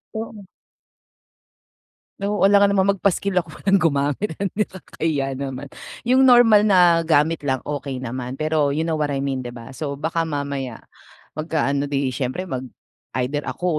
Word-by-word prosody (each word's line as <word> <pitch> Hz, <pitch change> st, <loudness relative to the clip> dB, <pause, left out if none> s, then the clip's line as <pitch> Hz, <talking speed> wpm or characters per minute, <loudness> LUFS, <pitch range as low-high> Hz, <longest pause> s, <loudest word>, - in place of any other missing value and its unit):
Oo. 220 Hz, -2 st, -6 dB, 1.7 s
Oo, 205 Hz, +1 st, -2 dB
alangan 200 Hz, 0 st, +5 dB
namang 200 Hz, 0 st, +2 dB
magpaskil 195 Hz, 0 st, 0 dB
ako, 165 Hz, -3 st, -2 dB
walang 195 Hz, 0 st, +4 dB
gumamit, 150 Hz, +2 st, 0 dB, 0.2 s
nakakahiya 155 Hz, -9 st, -2 dB
naman. 135 Hz, 0 st, -5 dB, 0.3 s
Yung 255 Hz, +2 st, +4 dB
normal 230 Hz, -4 st, +6 dB
na 175 Hz, -4 st, +5 dB
gamit 155 Hz, 0 st, +2 dB
lang, 130 Hz, -2 st, 0 dB
okey 140 Hz, -3 st, -5 dB
naman. 125 Hz, 0 st, -5 dB
Pero 155 Hz, -1 st, 0 dB
you 155 Hz, -, 0 dB
know 160 Hz, -1 st, -1 dB
what 150 Hz, -2 st, -1 dB
I 135 Hz, -, -1 dB
mean, 135 Hz, -2 st, -2 dB
'di 120 Hz, -, -6 dB
ba? 115 Hz, -1 st, -10 dB
So, 140 Hz, +1 st, -4 dB
baka 160 Hz, +3 st, -2 dB
mamaya 140 Hz, -5 st, -4 dB, 0.6 s
magkaano, 145 Hz, -3 st, 0 dB
di 140 Hz, -2 st, -1 dB
siyempre, 140 Hz, +8 st, -3 dB
mag 130 Hz, 0 st, -3 dB, 0.6 s
either 145 Hz, +4 st, -1 dB
ako 180 Hz, -, -5 dB
155 Hz, 150 wpm, -22 LUFS, 140-190 Hz, 1.7 s, normal